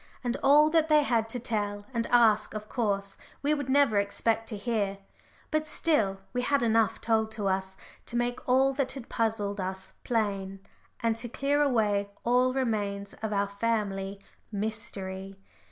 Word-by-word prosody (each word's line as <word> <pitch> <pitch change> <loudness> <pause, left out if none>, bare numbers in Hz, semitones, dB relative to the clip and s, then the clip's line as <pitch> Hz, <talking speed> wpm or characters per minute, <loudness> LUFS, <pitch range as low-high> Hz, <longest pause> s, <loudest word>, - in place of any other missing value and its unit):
And 245 -1 -1
all 295 +3 +6
that 320 -1 +3
they 300 -1 +6
had 230 -4 +1
to 245 - -3
tell 205 -3 -2
and 230 -1 -1
ask 220 -3 +4
of 215 0 -5
course 200 -5 -2 0.2
we 295 +2 +3
would 285 -3 -3
never 265 -6 +4
expect 225 +3 0
to 215 - -4
hear, 200 -2 -1 0.5
but 310 0 0
still, 220 -12 +1
we 250 - 0
had 280 +1 +1
enough 225 -1 +2
told 220 -1 +1
to 210 -3 -2
us 190 0 -1 0.3
to - - -7
make 240 +1 -2
all 265 +2 +4
that 270 -1 -1
had 265 -4 -9
puzzled 210 -3 -1
us 190 +1 -5
plain, 200 -4 -1 0.4
and 230 -1 +1
to 235 +1 -6
clear 280 +4 +1
away 210 -7 +2
all 250 +2 +3
remains 205 -6 -2
of 220 -1 -2
our 200 -1 +1
family 200 -2 -2 0.3
"mystery." 195 -3 -4
225 Hz, 165 wpm, -28 LUFS, 200-250 Hz, 0.5 s, all